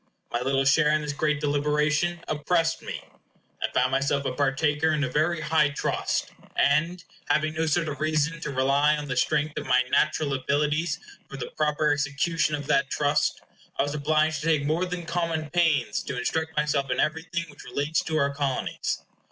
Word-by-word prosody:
My 120 - -1
little 135 +1 +1
share 150 +3 +4
in 155 0 +1
this 150 -1 -3
great 150 +1 0
deliberation 150 +4 +1
oppressed 165 +2 0
me. - - -6 0.6
I - - -1
found 130 +1 +2
myself 140 +1 +1
a - - 0
partaker 145 +3 +1
in 155 -2 +1
a - - +1
very 155 +5 0
high 155 -1 +3
trust; 145 - -2 0.2
and, 165 +5 +2 0.3
having 155 0 +2
no 160 0 -1
sort 165 +2 +1
of 145 -1 -5
reason 155 +1 0
to - - -3
rely 140 +3 +2
on 150 -1 -5
the 130 - -2
strength 150 +3 0
of - - -8
my 125 0 +4
natural 145 -3 +2
abilities 150 +4 0 0.3
for 135 - -7
the 130 - -6
proper 150 0 +1
execution 145 +2 0
of 145 -1 -6
that 140 0 +2
trust, 145 0 +1 0.4
I - - +3
was 145 - -3
obliged 155 +1 +1
to 160 - -3
take 155 -3 +2
more 165 +5 0
than 180 -1 -5
common 165 -2 -2
pains 155 -11 +2
to 130 - -4
instruct 160 +5 -2
myself 145 -2 +1
in - - -1
everything 165 +2 -1
which 145 - -13
relates 145 +3 -1
to 155 - -1
our 140 -1 +1
Colonies. 140 -2 -2
150 Hz, 185 wpm, -26 LUFS, 140-160 Hz, 0.6 s, share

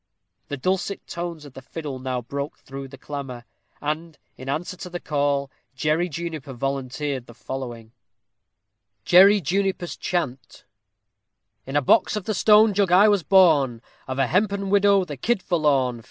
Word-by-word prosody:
The 145 - -4
dulcet 190 +6 -1
notes 170 -3 -5
of 140 - -12
the 135 - -10
fiddle 145 -1 -6
now 130 -1 -3
broke 140 +4 -5
through 135 0 -9
the 135 +1 -12
clamor; 135 -4 -7 0.3
and, 155 +2 -4 0.2
in 130 +1 -8
answer 160 +6 -3
to 180 - -8
the 175 0 -5
call, 140 -3 -1 0.2
Jerry 155 +5 0
Juniper 160 -3 -6
volunteered 135 +1 -3
the 120 - -13
following: 120 -4 -7 1.1
JERRY 195 +3 +7
JUNIPER'S 185 +1 -1
CHANT 140 -8 -4 1.0
In 135 - -5
a 145 - +3
box 220 - +3
of 210 - -3
the 215 - -1
stone 210 +2 +5
jug 195 -2 +1
I 200 +4 +7
was 205 -2 +3
born, 155 -10 +4 0.3
Of 130 0 -4
a 135 - +3
hempen 195 - 0
widow 200 -1 +4
the 145 -5 -7
kid 220 - 0
forlorn. 140 -7 +1
150 Hz, 155 wpm, -23 LUFS, 135-185 Hz, 1.1 s, JERRY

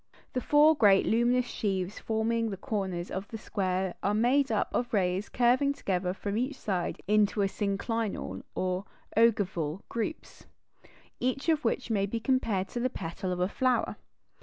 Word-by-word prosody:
The 255 - -1
four 300 +3 +6
great 205 -7 +5
luminous 240 +2 +3
sheaves 195 -4 -2
forming 225 +1 0
the 195 - -5
corners 190 -3 -3
of 195 +2 -4
the 225 - -6
square 190 -3 -1
are 205 +1 +1
made 255 +4 +3
up 215 - 0
of 240 - -1
rays 190 -1 +1
curving 255 +3 +3
together 185 -9 -1
from 205 +3 -3
each 265 +3 -1
side 185 -7 -2
into 210 0 +3
"synclinal" 205 +2 -2
or 185 +1 -1 0.3
ogival 200 -7 +2
groups, 235 +7 -5 0.7
each 255 +5 -1
of 310 -2 +2
which 250 - -1
may 200 -2 +1
be 230 +3 -2
compared 225 -6 0
to 240 - -4
the 255 +2 +1
petal 180 -2 -4
of 180 - -2
a 180 - +2
flower. 250 +3 +1
215 Hz, 160 wpm, -29 LUFS, 190-240 Hz, 0.7 s, four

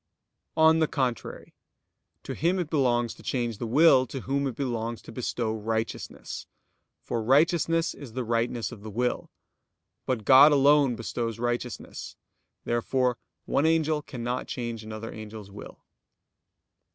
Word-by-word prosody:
On 160 0 +6
the 160 - +3
contrary, 130 -6 -3 0.7
To - - -5
him 175 +4 +1
it 175 -4 -3
belongs 120 -6 +2
to - - -16
change 120 -4 -2
the 120 - -3
will, 130 0 +5
to 135 - -6
whom 140 +2 -1
it 130 - -4
belongs 115 -3 -3
to - - -11
bestow 115 -1 -2
righteousness: 110 +1 -4 0.6
for 115 - -2
righteousness 165 +6 +3
is 130 -6 -11
the 130 +1 -2
rightness 115 +1 -1
of 115 -4 -10
the 110 - -8
will. 125 +4 -1 0.8
But 120 -5 -1
God 135 +3 +8
alone 140 -2 +5
bestows 115 0 -3
righteousness. 120 0 -4 0.5
Therefore 125 +1 0 0.3
one 145 - +2
angel 160 -2 +2
cannot 125 -3 -4
change 120 -3 -4
another 110 +1 -7
angel's 110 -2 -9
will. 100 - -11
125 Hz, 140 wpm, -27 LUFS, 115-140 Hz, 0.8 s, God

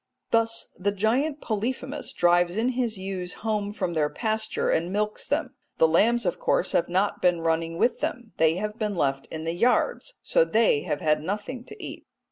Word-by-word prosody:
Thus 230 0 +2
the 200 +2 0
giant 250 +9 0
Polyphemus 260 +6 -3
drives 175 +1 +3
in 235 +3 +2
his 245 -4 -1
ewes 190 -2 -4
home 210 -2 0
from 180 -4 -2
their 150 -2 +1
pasture, 220 +2 -1
and 170 +3 0
milks 210 +1 -1
them. - - -1 0.2
The 160 - +5
lambs 230 +8 +3
of 175 - -1
course 185 - +1
have 170 - +1
not 190 +3 0
been 175 -2 +3
running 165 0 0
with 240 - +2
them; 240 -2 -4
they 160 0 +4
have 210 +4 -4
been 210 -2 -1
left 135 -4 0
in 160 0 -6
the 165 +1 -2
yards, 250 - +1
so - - +3
they 225 - +3
have 145 - -2
had 155 -1 +2
nothing 210 - -4
to 430 - -10
eat. - - -8
205 Hz, 190 wpm, -26 LUFS, 170-230 Hz, 0.2 s, The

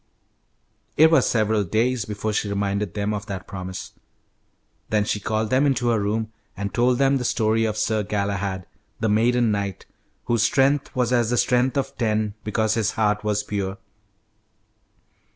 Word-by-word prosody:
It 160 +1 +7
was 160 - +4
several 110 -2 +2
days 115 +4 0
before 105 +1 -3
she 105 - -1
reminded 100 -1 -2
them 105 0 -1
of 105 -1 -5
that 95 -2 -5
promise. 95 -1 -7 1.0
Then 105 -1 +2
she 105 - -1
called 110 +2 -2
them 130 +2 +3
into 130 -3 +1
her 115 -2 +2
room 110 +2 -2 0.2
and 100 0 -4
told 125 +1 +2
them 135 +1 +3
the 125 - -3
story 115 -1 +1
of 110 -1 -2
Sir 110 0 +1
Galahad, 100 -2 -2 0.3
the 110 - 0
maiden 115 +2 +3
knight, 100 -2 -3 0.4
whose 120 -2 +1
"strength 135 +5 +2
was 125 -1 +1
as 120 -2 +2
the 120 - +1
strength 125 +3 +2
of 135 0 -2
ten 110 -2 0
because 110 0 0
his 110 -2 0
heart 105 -1 +1
was 105 -1 0
pure." 100 -1 -3
110 Hz, 165 wpm, -23 LUFS, 100-120 Hz, 1.0 s, It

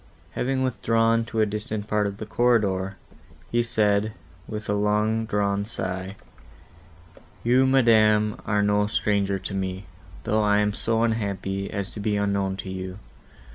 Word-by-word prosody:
—Having 130 +1 -1
withdrawn 115 -2 +2
to 115 -1 -1
a - - +5
distant 105 0 -4
part 105 -1 +1
of 100 0 -5
the 110 - -6
corridor, 100 -5 +1 0.5
he 120 - +3
said, 105 -2 +1 0.3
with 105 0 -6
a 105 - +1
long 105 +2 +1
drawn 100 -1 0
sigh, 95 -3 -5 1.3
"You, 125 +3 +4
madam, 110 -5 +4
are 105 -1 +2
no 105 0 +2
stranger 100 -2 0
to 95 - -6
me, 95 0 -3 0.4
though 110 +1 +1
I 105 -1 +3
am 105 0 +2
so 115 +1 0
unhappy 100 -3 -2
as 100 +2 -4
to - - -7
be 105 0 0
unknown 100 -1 0
to - - -6
you. 95 0 -6
105 Hz, 150 wpm, -25 LUFS, 100-110 Hz, 1.3 s, a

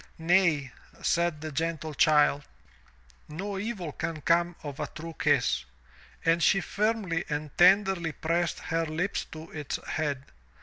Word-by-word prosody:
"Nay, 165 -5 +2 0.3
said 170 -3 +1
the 155 0 -5
gentle 160 0 -2
child, 150 -2 +4 0.9
"no 195 +6 -4
evil 200 -7 -4
can 160 +2 -4
come 170 +2 +2
of 145 -2 -7
a - - -2
true 165 +1 -8
kiss. 65 -1 +2 0.6
And 165 +1 +3
she 195 - +4
firmly 200 -4 -1
and 150 -1 -4
tenderly 190 -2 +4
pressed 170 +2 -1
her 165 0 -1
lips 170 +6 -2
to 155 +1 -10
its 150 -2 -4
head. 145 -4 -1
165 Hz, 135 wpm, -28 LUFS, 150-175 Hz, 0.9 s, child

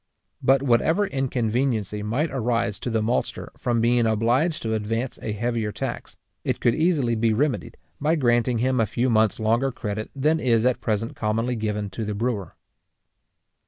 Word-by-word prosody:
But 135 +1 +3
whatever 150 +10 +3
inconveniency 120 - -1
might 125 +10 -1
arise 120 -5 -1
to - - -3
the 110 -2 0
maltster 120 +3 -2
from 120 -2 0
being 120 0 +3
obliged 120 +9 +1
to 110 -1 -1
advance 115 +4 -2
a 110 - -3
heavier 115 0 -1
tax, - - -5 0.3
it - - -1
could 120 - +3
easily 155 -7 +2
be 115 0 +2
remedied, 125 -2 -1 0.2
by 155 +3 +2
granting 120 -4 +2
him 130 +2 +1
a 110 - +2
few 120 +4 0
months 110 -1 +3
longer 115 +5 +1
credit 110 -3 -4
than 155 +4 +2
is 120 -4 +2
at 125 -1 +1
present 110 0 -1
commonly 115 +3 -1
given 105 -2 -2
to 110 +4 -4
the 105 -1 -3
brewer. 110 -4 -2
115 Hz, 165 wpm, -24 LUFS, 110-130 Hz, 0.3 s, But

